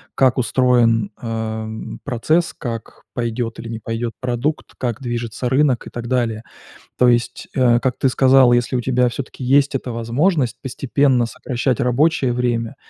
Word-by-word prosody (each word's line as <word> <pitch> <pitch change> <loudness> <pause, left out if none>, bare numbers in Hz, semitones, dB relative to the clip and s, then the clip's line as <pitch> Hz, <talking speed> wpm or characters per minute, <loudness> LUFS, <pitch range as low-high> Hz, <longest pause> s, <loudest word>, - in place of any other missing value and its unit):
как 130 -1 +3
устроен, 115 -3 +2
э, 110 -1 -3 0.4
процесс, 155 +7 +1
как 115 -3 -7
пойдет 115 -1 -3
или 115 - -7
не 115 -1 -5
пойдет 115 +1 -4
продукт, 125 +5 -2
как 120 0 -3
движется 120 0 -3
рынок 130 -2 +2
и - - -7
так 120 0 -6
далее. 115 -3 -1 0.5
То 125 - +4
есть, 120 0 +1
э, 120 -3 +4
как 130 -1 -1
ты 135 - +2
сказал, 130 -1 +5
если 120 +1 +1
у 125 - 0
тебя 125 0 +2
всё-таки 130 +1 -6
есть 140 +2 +3
эта 125 -2 -3
возможность 125 +4 0
постепенно 135 -1 +1
сокращать 125 +2 -2
рабочее 135 +1 +2
время 120 -2 -1
125 Hz, 155 wpm, -20 LUFS, 115-130 Hz, 0.5 s, сказал